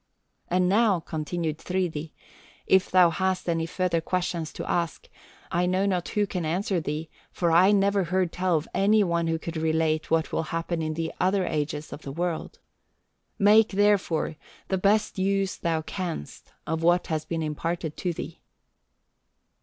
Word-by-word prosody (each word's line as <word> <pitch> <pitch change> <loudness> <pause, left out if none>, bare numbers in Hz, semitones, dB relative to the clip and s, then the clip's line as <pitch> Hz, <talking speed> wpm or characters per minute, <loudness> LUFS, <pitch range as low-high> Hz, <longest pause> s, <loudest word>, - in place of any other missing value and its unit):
"And 180 +1 +2
now," 205 -1 +3
continued 160 0 -3
Thridi, 170 -4 -2 0.5
"if 190 -1 +3
thou 180 -2 +5
hast 185 +2 -1
any 165 -1 0
further 180 -1 0
questions 175 -2 -2
to - - -6
ask, 170 -2 -2 0.4
I 180 0 +1
know 185 +2 +1
not 185 -3 -1
who 210 -1 +1
can 185 -3 -4
answer 175 +3 0
thee, 155 +1 -4 0.2
for 170 -2 0
I 180 +4 +6
never 200 -1 +3
heard 180 0 0
tell 180 -2 +1
of 150 - -4
any 210 +2 +4
one 170 -2 0
who 165 0 +1
could 165 +1 -6
relate 160 0 0
what 160 0 +1
will - - 0
happen 165 0 -2
in 155 0 -2
the 165 0 -3
other 190 0 +2
ages 150 0 -3
of 145 - -8
the 140 - -7
world. 170 +2 -3 0.8
Make, 210 +2 +6
therefore, 195 -6 +2 0.3
the 190 - 0
best 210 +1 +2
use 195 0 +1
thou 165 -2 -1
canst 170 - -6
of 160 +1 -2
what 175 +2 +3
has 155 -1 -2
been 165 +1 -3
imparted 160 +1 -3
to 180 - -1
thee." 165 - -7
175 Hz, 165 wpm, -26 LUFS, 160-190 Hz, 0.8 s, I